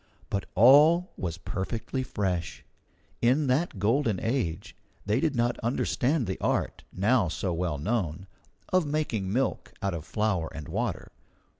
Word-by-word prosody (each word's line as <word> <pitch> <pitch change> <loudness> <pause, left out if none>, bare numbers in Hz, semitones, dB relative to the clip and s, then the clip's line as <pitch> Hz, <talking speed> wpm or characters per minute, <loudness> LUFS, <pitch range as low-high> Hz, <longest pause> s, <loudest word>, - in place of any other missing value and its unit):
But 100 - -2
all 150 - +6
was 85 -3 -4
perfectly 110 +7 -3
fresh. 95 -8 -3 0.6
In 130 +6 +3
that 135 0 0
golden 110 0 +1
age 110 -9 -2 0.3
they 105 +4 +1
did 150 0 0
not 120 0 +1
understand 125 +3 0
the 95 -1 -4
art, - - -1
now 105 +1 +2
so 90 +2 -2
well 85 -3 -1
known, 95 -1 -2 0.4
of 185 -1 +3
making 145 -11 -1
milk 130 +5 -1
out 100 -3 -1
of 80 -3 -4
flour 95 -2 -1
and 75 -2 -7
water. - - -3
110 Hz, 140 wpm, -28 LUFS, 95-130 Hz, 0.6 s, all